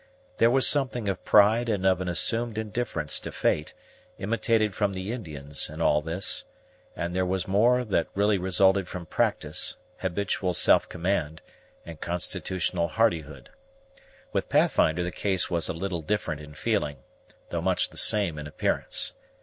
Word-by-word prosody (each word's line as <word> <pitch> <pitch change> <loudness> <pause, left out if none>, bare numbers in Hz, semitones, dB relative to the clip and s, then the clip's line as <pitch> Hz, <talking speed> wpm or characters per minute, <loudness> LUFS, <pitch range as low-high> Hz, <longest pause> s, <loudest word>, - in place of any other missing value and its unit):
There 115 - +5
was 130 +2 +5
something 130 -6 +1
of 95 -2 -2
pride 110 +3 +4
and 100 -4 -1
of 95 -1 +3
an 90 - -2
assumed 115 +5 0
indifference 110 -8 -1
to - - -7
fate, 75 0 -1 0.4
imitated 110 0 0
from 100 0 0
the 95 +3 -4
Indians, 75 - -2
in 80 +1 -9
all 75 -2 +3
this; 85 +5 0 0.5
but 85 +1 -3
there 95 0 +1
was 90 0 -2
more 120 +6 +3
that 95 -6 0
really 100 0 +2
resulted 95 +1 +3
from 90 -2 -7
practice, - - -1 0.2
habitual 95 -1 -1
self - - +4
command, 85 -3 -2 0.4
and 80 -2 -10
constitutional 90 0 -2
hardihood. 80 -5 -1 0.8
With - - -1
Pathfinder 80 +3 +2
the 90 - -3
case 95 -1 -1
was 85 0 0
a - - +1
little 85 0 -3
different 80 -4 -2
in 75 0 -12
feeling, 75 - -2 0.5
though - - -2
much - - +1
the - - -16
same 95 -8 +2
in 75 - -6
appearance. 75 - 0
95 Hz, 155 wpm, -26 LUFS, 85-105 Hz, 0.8 s, There